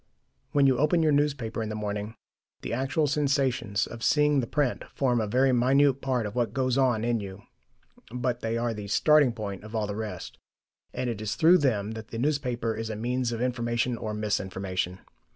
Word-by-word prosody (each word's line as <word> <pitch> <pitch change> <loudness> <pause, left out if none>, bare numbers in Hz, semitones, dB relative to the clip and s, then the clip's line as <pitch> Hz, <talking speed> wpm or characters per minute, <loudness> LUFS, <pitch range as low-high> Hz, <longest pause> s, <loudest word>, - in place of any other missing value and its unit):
When 140 -1 +4
you 130 -2 +3
open 155 +3 +3
your 155 - +3
newspaper 140 -6 0
in 110 - -3
the 110 - -4
morning, 105 +1 -4 0.5
the - - -4
actual 135 +5 0
sensations 135 -7 0
of 120 - -9
seeing 150 +2 +3
the 120 - -2
print 145 -2 0
form 125 -4 +1
a 110 - -1
very 130 +5 +3
minute 135 +2 +3
part 130 -4 0
of 105 - -5
what 120 -3 -1
goes 130 -2 +1
on 125 -5 +2
in 120 -1 +1
you, 100 0 -8 0.7
but 125 0 -2
they 115 -1 -2
are 115 0 -1
the 105 -2 -7
starting 145 +5 +4
point 105 -4 -6
of 110 +1 -8
all 110 -1 0
the 100 0 -4
rest, 105 -5 -6 0.5
and 130 - -3
it 115 -3 -3
is 110 0 -2
through 175 +3 +6
them 110 -8 0
that 110 0 -7
the 115 - -7
newspaper 125 -4 -1
is 110 0 -4
a 110 - -3
means 120 +2 -1
of 115 +1 -2
information 120 0 -1
or 110 -2 -4
mis 105 -1 0
information. 95 -1 -4
120 Hz, 205 wpm, -27 LUFS, 110-135 Hz, 0.7 s, through